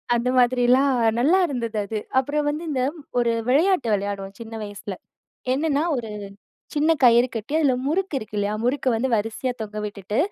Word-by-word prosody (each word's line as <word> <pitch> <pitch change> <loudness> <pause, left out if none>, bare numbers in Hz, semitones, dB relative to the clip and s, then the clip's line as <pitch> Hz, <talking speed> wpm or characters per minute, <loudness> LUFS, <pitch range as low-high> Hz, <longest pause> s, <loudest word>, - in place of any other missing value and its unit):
அந்த 240 +1 0
மாதிரிலாம் 250 +2 +4 0.3
நல்லா 325 +10 +4
இருந்தது 235 -6 -3
அது. 220 +2 -4 0.2
அப்புறம் 290 +3 +1
வந்து 300 +3 -3
இந்த 260 - 0 0.4
ஒரு 235 -1 +2 0.2
விளையாட்டு 315 +1 +3
விளையாடுவோம் 200 -1 -3
சின்ன 225 -1 -9
வயசுல. 205 -1 -7 0.6
என்னன்னா 290 +1 +1
ஒரு 235 -4 -4 0.7
சின்ன 305 +2 +3
கயிறு 240 0 +6
கட்டி 225 +4 -5
அதுல 285 -5 +3
முறுக்கு 360 +3 -1
இருக்கு 215 -3 -8
இல்லயா, 205 +1 0
முறுக்கு 260 +2 +1
வந்து 235 +4 0
வரிசையா 225 +4 -1
தொங்க 215 0 -5
விட்டுட்டு, 205 0 -4
245 Hz, 155 wpm, -23 LUFS, 215-285 Hz, 0.7 s, கயிறு